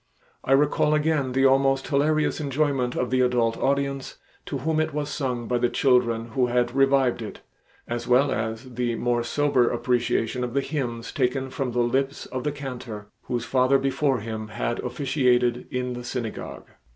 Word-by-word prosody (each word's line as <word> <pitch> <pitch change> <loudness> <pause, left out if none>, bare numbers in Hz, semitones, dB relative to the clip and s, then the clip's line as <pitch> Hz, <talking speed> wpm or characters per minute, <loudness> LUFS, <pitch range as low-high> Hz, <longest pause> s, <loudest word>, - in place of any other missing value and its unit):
I 135 - +2
recall 150 +2 +3
again 150 -4 +1
the 135 +1 +3
almost 135 0 +3
hilarious 155 +2 +1
enjoyment 140 -3 0
of 125 -1 -1
the 130 0 +3
adult 120 -2 +2
audience 140 -1 -1 0.3
to 140 - -3
whom 155 +4 0
it 155 -2 -1
was 145 -1 -2
sung 125 -5 -2
by 125 -1 0
the 120 - +2
children 120 -4 +2
who 125 +2 +1
had 120 0 +1
revived 135 -3 +3
it, 110 - -7 0.5
as 120 0 -4
well 130 +3 +4
as 110 +3 -3
the 120 -1 -1
more 120 0 0
sober 130 0 +2
appreciation 120 0 0
of 120 +1 -4
the 140 - +3
hymns 120 -6 -4
taken 130 0 -1
from 130 -2 -3
the 120 - +2
lips 135 +3 -1
of 130 -1 -5
the 150 - 0
cantor, 125 -7 -7 0.2
whose 120 -2 -2
father 130 +2 +3
before 135 -2 0
him 110 -1 -5
had 120 +2 -3
officiated 125 -2 +1
in 125 -1 -2
the 125 0 -6
synagogue. 120 -2 -5
125 Hz, 175 wpm, -25 LUFS, 120-140 Hz, 0.5 s, well